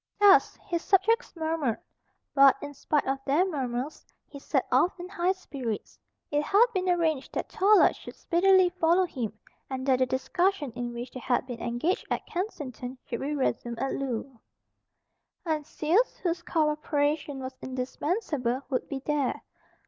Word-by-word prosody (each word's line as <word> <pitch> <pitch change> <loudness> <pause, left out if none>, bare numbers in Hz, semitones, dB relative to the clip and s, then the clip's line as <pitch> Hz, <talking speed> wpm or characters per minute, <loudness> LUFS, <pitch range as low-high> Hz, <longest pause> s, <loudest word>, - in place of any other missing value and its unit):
Thus 405 -1 +6
his 340 -1 -1
subjects 405 +6 +2
murmured; 315 -7 -1 0.6
but, 275 -1 +7
in 290 +1 -7
spite 295 +1 0
of 270 0 -1
their 290 +7 +3
murmurs, 270 -4 -3 0.2
he 280 - -11
set - - 0
off 360 +1 +3
in 355 - -6
high 365 0 0
spirits. 265 - -6 0.3
It 295 0 +2
had 405 +9 +5
been 370 -2 0
arranged 325 -6 0
that - - -2
Tallard 420 0 +5
should - - -11
speedily 375 +1 +4
follow 350 +1 +3
him, 230 - -5 0.3
and 260 -1 -4
that 260 -2 +3
the 255 - +3
discussion 340 +3 0
in 240 +1 -4
which 240 +1 -6
they 255 - -7
had 250 0 0
been 245 -3 -7
engaged 240 +10 -1
at - - -2
Kensington 270 - -5
should 235 - -4
be 295 +2 -2
resumed 240 -3 -1
at 270 - -1
Loo. 260 -1 -4 1.1
Heinsius, 315 +6 +1
whose 345 -1 -2
cooperation 300 -3 0
was 260 0 -6
indispensable, 260 - -2
would 255 - -1
be 275 -2 -5
there. 295 -3 0
295 Hz, 155 wpm, -28 LUFS, 260-350 Hz, 1.1 s, but